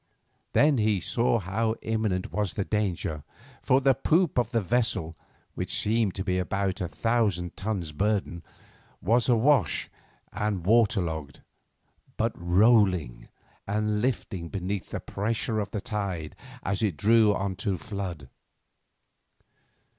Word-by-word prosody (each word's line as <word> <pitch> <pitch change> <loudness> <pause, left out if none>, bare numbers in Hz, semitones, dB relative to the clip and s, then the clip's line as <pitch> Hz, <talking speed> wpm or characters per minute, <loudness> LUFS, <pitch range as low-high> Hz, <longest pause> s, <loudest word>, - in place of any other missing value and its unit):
Then 145 -3 +4
he 105 -2 +2
saw 115 +6 +1
how 110 +3 -1
imminent 110 -3 -1
was 105 -4 -1
the 100 - -1
danger, 90 -8 -2 0.4
for 130 - +3
the 135 0 +5
poop 160 +3 +2
of 120 - 0
the 120 -2 +1
vessel, 105 -6 0 0.4
which - - -2
seemed 110 -2 +1
to 95 - -3
be 90 0 0
of 90 - -2
about 100 0 -1
a 90 - -1
thousand 105 -5 0
tons 95 -6 -3
burden, 95 0 -1 0.6
was 115 +6 +2
awash 120 - +3 0.4
and 105 -5 -2
water 110 -2 +4
logged, 80 -4 -5 0.8
but 115 +1 +1
rolling 90 - +3 0.4
and 105 +1 0
lifting 95 -8 -2
beneath 100 0 -4
the - - -4
pressure 110 +2 -2
of 100 -1 -2
the 105 - -4
tide 95 -8 -4 0.3
as 100 +2 -1
it 100 -8 0
drew 110 +2 +4
on 100 -1 -2
to 100 -2 -1
flood. 95 - -6
105 Hz, 135 wpm, -27 LUFS, 90-115 Hz, 0.8 s, the